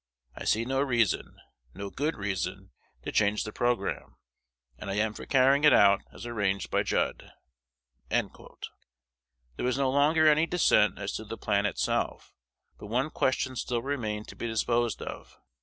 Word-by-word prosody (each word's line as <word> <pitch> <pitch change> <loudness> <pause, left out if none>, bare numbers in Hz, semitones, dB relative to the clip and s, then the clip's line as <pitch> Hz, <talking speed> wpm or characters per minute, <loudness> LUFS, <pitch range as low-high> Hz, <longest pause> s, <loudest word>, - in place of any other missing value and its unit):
I - - -8
see 115 +2 +2
no 135 +2 0
reason, 120 -7 0 0.4
no 100 +1 -6
good 150 +4 -2
reason, 100 -3 -4 0.3
to - - -4
change 105 0 +2
the 110 - -6
programme; 120 +2 -2 0.6
and 105 - -7
I 95 - -2
am 110 +1 0
for - - -10
carrying 135 +2 +4
it 150 -3 +7
out 100 0 +5
as - - -10
arranged 105 -5 -2
by - - +2
Judd." - - -1 0.8
There - - +1 1.3
was 125 +1 0
no 135 -1 +1
longer 150 +3 +3
any 155 +1 +5
dissent 160 -12 +3
as 100 0 -4
to 110 - -7
the 110 +1 -7
plan 100 -1 +1
itself; 95 - -2 0.5
but - - -9
one 130 +8 -1
question 130 0 0
still 120 -1 -2
remained 110 -7 -3
to - - -10
be 120 - -4
disposed 115 0 0
of. - - -9
120 Hz, 160 wpm, -28 LUFS, 105-135 Hz, 1.3 s, it